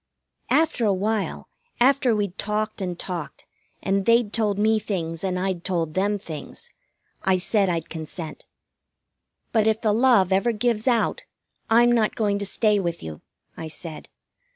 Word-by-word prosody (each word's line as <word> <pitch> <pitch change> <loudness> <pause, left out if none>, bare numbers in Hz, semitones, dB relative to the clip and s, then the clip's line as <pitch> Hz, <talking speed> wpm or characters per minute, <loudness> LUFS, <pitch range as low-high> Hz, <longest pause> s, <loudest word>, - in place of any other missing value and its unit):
After 315 -6 +2
a 205 -3 +3
while, 210 +1 -2 0.3
after 255 -2 +4
we'd 200 -3 -2
talked 215 0 -2
and 180 -2 -3
talked, 175 -5 -5 0.4
and 195 0 0
they'd 230 -2 +3
told 210 -3 0
me 215 +1 +3
things 165 -6 -3
and 185 -1 -1
I'd 185 -2 -2
told 170 -4 -1
them 205 +2 +1
things, 160 -7 -9 0.5
I 190 -1 +2
said 195 +1 +1
I'd 165 -2 -2
consent. 160 0 -7 1.1
"But 220 -2 +2
if 220 0 +2
the 215 -2 +2
love 220 -6 +4
ever 230 +5 +2
gives 225 +1 0
out, 240 -3 +1 0.4
I'm 240 +2 +5
not 225 -3 +2
going 205 -2 0
to 200 - -1
stay 210 0 +2
with 170 -3 -3
you," 80 -1 -8 0.3
I 160 - -6
said. 160 0 -8
205 Hz, 155 wpm, -24 LUFS, 180-220 Hz, 1.1 s, I'm